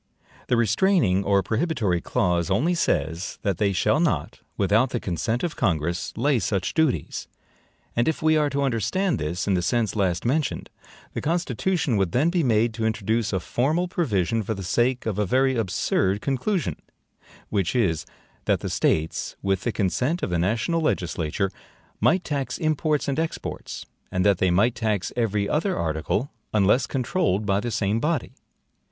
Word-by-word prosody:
The 125 - +2
restraining 115 - +3
or 100 -1 +2
prohibitory 110 - 0
clause 85 0 0
only 135 - +2
says, 85 - -1
that 100 -4 -1
they 100 -2 +2
shall 100 +10 +2
not, 120 - 0 0.2
WITHOUT 110 +6 +3
THE 120 - -2
CONSENT 110 +6 -2
OF 175 - -2
CONGRESS, 85 -4 -1
lay 140 -4 +2
such 95 -1 -1
duties; 160 -5 0 0.7
and 120 - +2
if 160 - 0
we 155 0 +3
are 150 -1 +2
to 140 0 -1
understand 140 - 0
this 85 +4 -2
in 100 - +3
the 90 - +2
sense 110 +5 0
last 95 -3 0
mentioned, 145 +4 -1 0.4
the - - -3
Constitution 165 - 0
would 95 -3 0
then 150 +7 +3
be 175 -1 +2
made 115 -2 +2
to 110 0 -2
introduce 110 0 0
a 95 - 0
formal 155 - 0
provision 115 - 0
for 110 +1 -3
the 95 - -6
sake 120 +7 +1
of 105 -3 -2
a 105 - +2
very 130 +5 +2
absurd 100 -2 0
conclusion; 140 - -1 0.7
which 100 0 0
is, 85 - +1 0.4
that - - +1
the - - -3
States, 80 +1 0
WITH 95 -1 +1
THE 120 - +1
CONSENT 125 - 0
of - - -1
the 85 - +1
national 115 - 0
legislature, 90 - -1 0.5
might 185 +2 +3
tax 140 -3 -2
imports 155 -2 0
and 140 +2 0
exports; 165 0 -4 0.3
and 90 0 0
that 100 -3 +4
they 95 - +3
might 105 +7 +3
tax 105 -5 -1
every 105 -4 0
other 180 - 0
article, 80 - -1 0.2
UNLESS 105 +6 +3
CONTROLLED 125 - 0
by 100 -1 +2
the 120 +3 -3
same 110 -1 0
body. 150 0 -1
110 Hz, 170 wpm, -24 LUFS, 95-145 Hz, 0.7 s, that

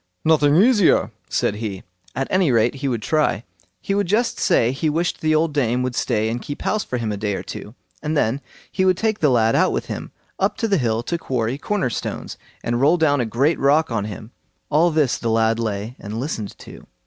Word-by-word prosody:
"Nothing 150 -2 +4
easier", 205 0 +4 0.2
said 105 - 0
he; 105 -4 -5 0.3
at 135 +2 -1
any 185 -6 +3
rate 115 0 +3
he 140 0 -4
would 120 -5 -2
try. 150 -8 +1 0.4
He 195 - -2
would 200 -1 +1
just 225 +6 +1
say 115 +1 +3
he 150 +4 -1
wished 165 +3 -1
the 155 0 +2
old 155 0 +1
dame 125 -3 +1
would 130 -1 -2
stay 110 -3 0
and 120 +2 -2
keep 145 - -7
house 215 - 0
for 125 - -3
him 115 -3 -2
a 105 - -3
day 105 -1 -2
or - - -5
two, 105 - -8 0.3
and 150 0 -1
then 130 +1 +1 0.3
he 190 - 0
would 185 -1 +3
take 220 +1 0
the 150 - +3
lad 115 -3 +3
out - - +3
with - - -2
him - - -6 0.3
up 195 +2 +1
the 205 -6 +1
hill 115 -2 0
to 170 +6 -2
quarry 125 -2 -2
corner 200 - -1
stones, - - -5 0.3
and 120 +1 -1
roll 155 +6 +4
down 145 -5 +2
a 120 - -1
great 135 +9 +1
rock 145 +2 +3
on 105 -3 -1
him. 110 +2 -8 0.4
All 160 +4 +4
this 155 -5 +1
the 115 - -2
lad 115 0 +2
lay 110 +1 -3
and 105 +2 -6
listened 115 -7 -4
to. - - -13
135 Hz, 220 wpm, -21 LUFS, 115-160 Hz, 0.4 s, Nothing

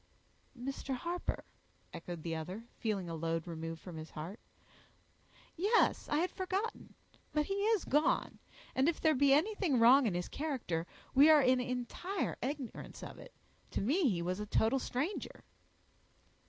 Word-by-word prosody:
"Mr. 270 +1 -3
Harper," 345 +7 -3 0.5
echoed 170 -1 -7
the 165 -1 -2
other, 180 +7 -5 0.2
feeling 205 -5 -1
a 165 - -4
load 165 0 -2
removed 165 -1 -5
from 170 0 -9
his 155 0 -7
heart, 170 +8 -7 1.2
"yes, 415 +7 +2
I 295 - +2
had 350 +4 +1
forgotten; 385 +4 -3 0.4
but 300 -1 +2
he 390 - -2
is 415 +1 +1
gone; 295 +3 +1 0.3
and 265 +4 +3
if 340 - -2
there 315 - +4
be 280 0 +4
anything 335 - +3
wrong 245 +3 +7
in 190 - -1
his 175 0 -2
character, 240 - -3 0.3
we 280 +4 +7
are 305 -3 +7
in 255 0 +4
entire 250 +10 -2
ignorance 270 -2 -5
of - - -8
it; - - -12 0.4
to - - -2
me 285 - +3
he 170 -5 -1
was 180 +3 -2
a 210 - -4
total 225 +6 +2
stranger." 280 +10 -3
255 Hz, 155 wpm, -34 LUFS, -, 1.2 s, wrong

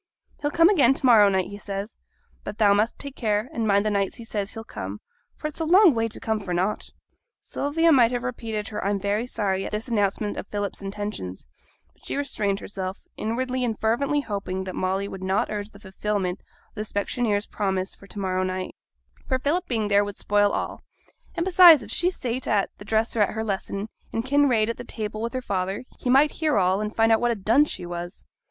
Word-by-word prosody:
'He'll 290 - 0
come 330 +3 +5
again 280 -10 +5
to - - -2
morrow 220 -5 +7
night, 190 -2 0
he 205 0 -8
says. 200 +1 -5 0.5
But 210 - -6
thou 205 -2 +5
must 215 +3 +1
take 280 -1 -8
care, 215 +1 -1
and 225 -2 -1
mind 200 0 +3
the 215 - +1
nights 200 -1 0
he 230 - -9
says 205 -2 -3
he'll 225 - -6
come, 100 - -7 0.4
for - - -10
it's 305 +1 -4
a - - 0
long 355 +1 +6
way 225 -1 0
to 225 - -7
come 220 -1 -1
for 185 -4 -3
nought.' 190 +4 -1 0.5
Sylvia 325 +4 +1
might 245 -6 +6
have 245 0 -3
repeated 225 -4 -4
her 210 - -4
'I'm 200 +1 0
very 205 +4 -1
sorry' 195 -5 -1
at - - -5
this 215 +4 -4
announcement 205 -1 0
of - - -5
Philip's 205 -1 -4
intentions; 195 - -5 0.5
but - - -32
she - - -4
restrained 215 -8 -1
herself, 190 -2 -5 0.2
inwardly 250 +3 -2
and 225 -3 -2
fervently 280 +6 +1
hoping 195 -5 -4
that 185 -1 -6
Molly 190 +2 -1
would 190 -1 -8
not 190 +3 0
urge 205 0 -4
the 200 - -16
fulfilment 195 -1 -2 0.3
of - - -41
the 215 - -5
specksioneer's 210 0 -1
promise 190 -2 -2
for 200 - -16
to 205 - -9
morrow 185 -2 -1
night, 185 0 -3 0.5
for 260 - +1
Philip's 325 +8 0
being 220 -4 0
there 205 0 +4
would 205 -1 -6
spoil 205 0 +2
all; - - -3 0.5
and 335 - 0
besides, 350 -7 +8
if 210 - -9
she 350 +7 +2
sate 255 -7 -3
at 205 -3 +1
the 205 - -10
dresser 220 +1 +1
at 205 - +1
her 220 - -2
lesson, 200 0 -3 0.2
and 225 +1 -2
Kinraid 265 -6 +3
at 230 - -3
the - - -7
table 215 -2 -4
with 235 +2 -3
her 255 -1 -3
father, 190 0 -2 0.2
he 250 - -3
might 275 +4 +5
hear 310 -2 0
all, 190 +1 +2
and 215 0 -4
find 225 0 +4
out 225 - +4
what 240 - +2
a 235 - +1
dunce 225 +9 +3
she 180 - -4
was. 175 +2 -7
215 Hz, 220 wpm, -25 LUFS, 200-245 Hz, 0.5 s, besides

